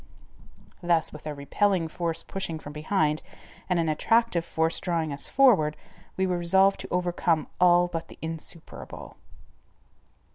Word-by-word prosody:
Thus 170 -2 +1
with 150 0 -9
a 150 - -4
repelling 175 +5 +1
force 165 0 -1
pushing 190 -4 -4
from 145 -1 -10
behind 155 0 0 0.5
and 180 - +2
an 165 - +1
attractive 200 +3 +2
force 160 0 0
drawing 165 -4 -1
us 140 - -3
forward, 185 - +4 0.4
we 190 - +2
were 180 -1 0
resolved 190 +3 +3
to - - -6
overcome 175 -3 0
all 175 0 +5
but 165 -1 -5
the - - -13
insuperable. 160 0 -8
170 Hz, 140 wpm, -27 LUFS, 155-180 Hz, 0.5 s, all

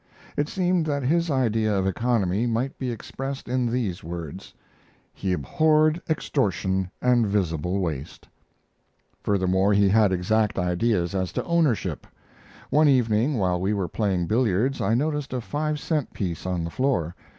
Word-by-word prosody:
It 145 +1 0
seemed 180 -3 +1
that 140 -2 -1
his 165 +6 +1
idea 110 -6 +1
of 95 - 0
economy 105 0 +1
might 120 +4 -2
be 130 - -2
expressed 135 +4 -6
in 125 0 0
these 115 -7 -2
words: 85 -3 -7 0.6
He 95 - -3
abhorred 155 - +2
extortion 95 - 0
and 120 -3 +3
visible 90 -3 0
waste. 80 -6 -4 0.9
Furthermore, 95 0 +2
he 100 -1 +4
had 105 -1 +4
exact 105 +4 +1
ideas 90 0 0
as 95 -2 -1
to - - -2
ownership. 165 - 0 0.6
One 150 +1 +5
evening, 125 0 +3
while 90 -5 0
we 100 +3 +1
were 95 -3 -1
playing 95 -5 0
billiards, 115 +5 +1
I 110 +4 +2
noticed 145 0 -1
a 130 - -1
five 150 +5 -2
cent 150 -3 -2
piece 90 -2 -4
on 90 -2 -1
the 85 - -4
floor. 120 - 0
110 Hz, 150 wpm, -25 LUFS, 95-135 Hz, 0.9 s, One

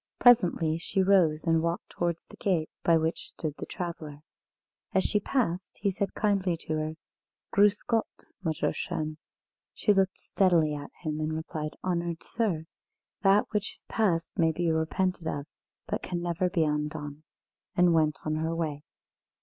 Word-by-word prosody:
Presently 175 -9 +5
she 190 +3 0
rose 175 -6 +4
and 165 -1 +3
walked 170 +1 -2
towards 170 -1 -1
the - - -14
gate, 170 -6 0
by 165 -1 +5
which 160 +1 -1
stood 155 -3 -4
the - - -5
traveller. 155 -4 -6 0.7
As 190 - +4
she 210 - +2
passed, 195 -6 -1
he 200 0 +1
said 195 +1 -2
kindly 195 -5 +1
to 155 - -3
her: 155 +1 -2 0.6
"Grüss 205 +1 +4
Gott, 225 -1 +1 0.4
Mütterchen." 155 -1 -2 0.6
She 210 - +3
looked 190 -1 +2
steadily 170 -6 +2
at 145 -1 -6
him 155 -2 -2
and 155 0 -1
replied: 155 -1 -4
"Honoured 170 -2 -1
sir! 195 -9 -1 0.6
that 200 +1 +5
which 210 -1 -1
is - - -18
past 180 -5 0
may 165 -1 +4
be 170 +1 0
repented 165 +2 0
of, 145 -2 -2 0.4
but - - -2
can 175 -1 -3
never 175 +1 0
be 170 -2 +2
undone!" 150 -1 -2 0.5
and 175 -1 +5
went 155 -2 +3
on 155 0 0
her 160 +1 -1
way. 155 -3 -2
170 Hz, 160 wpm, -29 LUFS, 155-190 Hz, 0.7 s, Presently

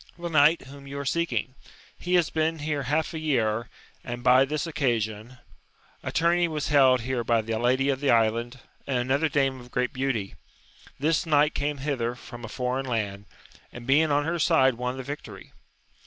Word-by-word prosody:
— - - -32
The 170 0 -5
knight 155 +1 +4
whom 140 +1 -12
you 140 +1 -7
are 140 - -4
seeking; 170 -3 -1 0.4
he 180 +1 -1
has 165 -7 +2
been 160 +1 0
here 150 -1 -2
half 150 +6 -1
a 160 - -4
year, 120 -7 0 0.3
and 120 -1 -6
by 130 +2 +6
this 150 +4 -2
occasion: 120 -6 -2 0.6
a - - -4
tumey 170 +1 +2
was 155 -3 -3
held 130 -4 +5
here 125 0 -2
by 115 0 +2
the 115 +1 -3
lady 130 +3 +2
of 135 -1 0
the 145 -1 0
island, 115 +2 +2 0.3
and 135 -2 0
another 135 +6 +1
dame 135 -2 0
of 125 0 -13
great 125 +2 -1
beauty; 130 -7 -2 0.6
this 160 +4 0
knight 150 -1 +3
came 145 0 -2
hither 130 -4 -2
from 120 -1 -11
a - - -5
foreign 130 +1 -2
land, 100 -4 -3 0.5
and 120 0 -10
being 150 +5 +3
on 145 0 +2
her 170 +1 -1
side 130 -3 +4
won 125 +2 -4
the 130 - -5
victory. 145 +3 -8
135 Hz, 190 wpm, -26 LUFS, 120-150 Hz, 0.6 s, by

